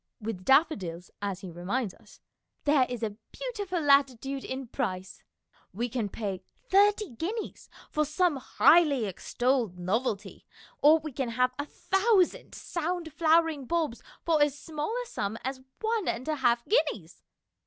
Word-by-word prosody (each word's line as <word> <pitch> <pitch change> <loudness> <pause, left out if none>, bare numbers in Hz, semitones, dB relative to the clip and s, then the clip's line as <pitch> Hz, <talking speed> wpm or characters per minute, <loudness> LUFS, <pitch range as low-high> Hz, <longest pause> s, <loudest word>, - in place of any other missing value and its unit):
With 215 -4 -5
daffodils, 195 - +2
as 195 -2 -3
he 185 -3 -7
reminds 190 +5 -2
us, - - -19 0.2
" - - -49
there 285 -3 +4
is 245 -2 -4
a 210 -2 -3
beautiful 415 -8 -3
latitude 275 -2 +2
in 265 +1 -5
price." 190 -7 -4 0.5
We 240 +4 -1
can 230 -3 -2
pay 195 -3 -4
" - - -39
thirty 410 -2 +4
guineas 375 - -5 0.2
for 305 - +2
some 310 +1 +1
highly 285 -1 +4
extolled 235 +1 -1
novelty, 205 +4 -2 0.3
or 305 +2 +7
we 310 -1 -6
can 260 -1 -2
have 250 +2 +1
a 290 - -2
thousand 390 +5 +1
sound 340 -2 -3
flowering 320 -3 +3
bulbs 320 -8 -1 0.2
for 320 -3 +3
as 290 -1 +3
small 305 -1 -4
a - - -2
sum 215 - -3
as 265 0 -4 0.2
one 445 -2 0
and 245 +4 -2
a 310 -1 0
half 240 -3 +2
guineas. 225 - 0
275 Hz, 155 wpm, -28 LUFS, 225-330 Hz, 0.5 s, or